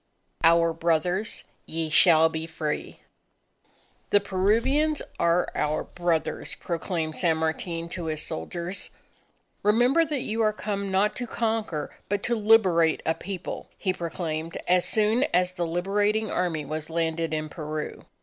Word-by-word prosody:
OUR 165 0 +5
BROTHERS, 170 +5 0 0.2
YE 160 -1 -3
SHALL 160 -1 +6
BE 160 0 -4
FREE! 155 -2 -4 1.1
"The 205 - +5
Peruvians 230 +11 +1 0.2
are 170 +1 +2
our 150 +1 0
brothers," 175 -2 -2
proclaimed 165 -2 -3
San 165 -3 +2
Martin 165 +1 -2
to 175 -1 -5
his 155 -1 -2
soldiers. 170 - -5 0.7
"Remember 245 +9 +4
that 295 -4 -2
you 225 +1 -1
are 215 -1 +3
come 200 -2 -3
not 200 +3 +2
to 245 - -3
conquer 220 -10 -2
but 205 0 -1
to 240 - +1
liberate 195 -7 +4
a 160 - +2
People!" 185 +1 -6
he 185 - 0
proclaimed 165 -2 -4
as 180 0 +4
soon 220 +5 +3
as 180 0 +3
the 175 -2 -2
Liberating 205 +5 0
Army 165 -5 -1
was 155 +2 -4
landed 165 0 -1
in 155 0 -2
Peru. 155 -1 -5
175 Hz, 140 wpm, -26 LUFS, 160-210 Hz, 1.1 s, SHALL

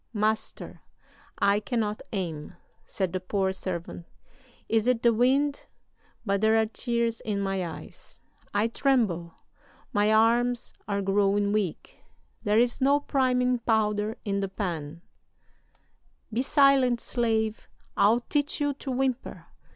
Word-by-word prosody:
'Master, 215 0 -2 0.6
I 200 +1 +3
cannot 215 -1 -2
aim,' 170 -7 -4 0.3
said 190 -3 -2
the 185 - -1
poor 190 +1 -1
servant; 175 -2 -6 0.6
'is 225 +1 +1
it 250 -2 +1
the 235 -1 +5
wind? 275 +5 +1 0.6
But 200 -1 0
there 220 +1 +4
are 220 - +3
tears 235 0 -2
in 210 -2 -2
my 195 -1 -1
eyes 165 -2 -9 0.3
I 205 +2 +1
tremble 220 - 0 0.6
my 210 0 +3
arms 235 +2 +2
are 200 -1 -1
growing 200 +1 +2
weak; 205 -6 -3 0.4
there 210 -1 +2
is 240 +2 +2
no 280 +2 +4
priming 250 -3 +1
powder 215 -1 0
in 200 -1 -1
the 195 -1 -2
pan' 170 -5 -5 1.3
"'Be 235 - +1
silent, 270 -3 +4
slave; 220 -3 -1 0.3
I'll 225 +4 +4
teach 290 +4 0
you 290 -1 +1
to 275 0 -8
whimper! 260 0 -2
220 Hz, 130 wpm, -27 LUFS, 200-245 Hz, 1.3 s, the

